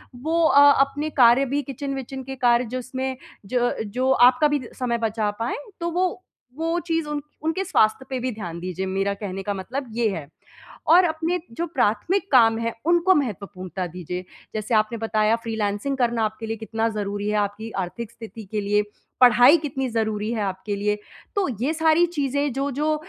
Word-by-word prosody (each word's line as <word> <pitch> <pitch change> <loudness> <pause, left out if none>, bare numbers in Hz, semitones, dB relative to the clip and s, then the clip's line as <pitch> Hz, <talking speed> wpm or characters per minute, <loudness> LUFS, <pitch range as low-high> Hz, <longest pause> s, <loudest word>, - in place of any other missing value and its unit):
वो 320 +7 0
अ, 285 +1 +7
अपने 285 +3 0
कार्य 240 +4 +6
भी 290 - +1
किचन 275 +1 -4
विचन 265 0 -6
के 265 +1 -6
कार्य, 245 -1 +3
जिसमें 260 +1 -4 0.3
ज 255 - -5
अ, 245 0 +2
जो 255 +5 0
आपका 250 +3 +5
भी 290 -1 0
द 245 - -10
समय 240 -2 0
बचा 215 -1 -1
पाएँ, 240 - -2 0.2
तो 340 - 0
वो 365 +1 -1 0.3
वो 330 +2 0
चीज़ 330 -2 0
उन 295 -1 -2 0.2
उनके 325 +4 0
स्वास्थ्य 260 -6 +2
पे 260 -1 -2
भी 255 +1 -2
ध्यान 175 -5 -6
दीजिए, 185 +1 -4
मेरा 195 +1 -1
कहने 195 -2 -5
का 205 - -2
मतलब 245 +8 -5
ये 235 -1 +1
है, 165 -7 -5 0.6
और 345 +4 +7
अपने 330 +2 -1
जो 335 +9 -3
प्राथमिक 310 - 0
काम 225 -3 +6
हैं, 230 0 -2
उनको 345 +2 +4
महत्वपूर्णता 195 - -3
दीजिए। 180 +1 -6 0.3
जैसे 215 +2 -2
आपने 215 +2 +2
बताया, 220 0 +2
फ़्रीलांसिंग 225 +3 -2
करना 235 -2 +1
आपके 220 +1 -4
लिए 225 0 -3
कितना 225 +1 -2
ज़रूरी 205 -1 -3
है, 210 - +1
आपकी 205 +2 -2
आर्थिक 220 +5 -6
स्थिति 225 -1 -10
के 210 - 0
लिए, 205 +1 +2 0.4
पढ़ाई 250 +4 +7
कितनी 270 -2 -2
ज़रूरी 220 -1 -1
है 220 -3 -1
आपके 195 +1 -3
लिए। 210 +1 0 0.4
तो 390 -5 +2
ये 295 +5 +1
सारी 320 +2 +4
चीज़ें, 285 -3 -1
जो-जो 285 +4 0
240 Hz, 185 wpm, -23 LUFS, 210-285 Hz, 0.6 s, अ